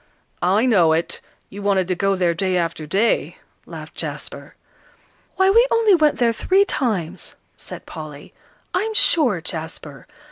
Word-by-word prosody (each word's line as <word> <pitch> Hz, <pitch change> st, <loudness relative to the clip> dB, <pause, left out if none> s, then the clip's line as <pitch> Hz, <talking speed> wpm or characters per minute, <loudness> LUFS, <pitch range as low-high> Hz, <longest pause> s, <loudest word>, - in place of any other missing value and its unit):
"I 195 Hz, +7 st, +2 dB
know 180 Hz, -10 st, +4 dB
it; 165 Hz, +1 st, -2 dB, 0.3 s
you 200 Hz, -, -8 dB
wanted 195 Hz, -3 st, +1 dB
to -, -, +2 dB
go 195 Hz, +2 st, 0 dB
there 180 Hz, -2 st, +1 dB
day 185 Hz, +1 st, -1 dB
after 165 Hz, -3 st, -3 dB
day," 200 Hz, +8 st, 0 dB, 0.3 s
laughed -, -, -9 dB
Jasper. -, -, -7 dB, 0.8 s
"Why, 380 Hz, 0 st, +3 dB
we 470 Hz, +4 st, +5 dB
only 455 Hz, -3 st, +3 dB
went 310 Hz, -4 st, +3 dB
there 235 Hz, -2 st, +2 dB
three 385 Hz, -, +2 dB
times," 215 Hz, -, -3 dB, 0.2 s
said -, -, -10 dB
Polly, 150 Hz, -2 st, -10 dB, 0.4 s
"I'm 435 Hz, +4 st, -1 dB
sure, 255 Hz, -, +3 dB
Jasper. 160 Hz, -3 st, -7 dB
195 Hz, 145 wpm, -21 LUFS, -, 0.8 s, we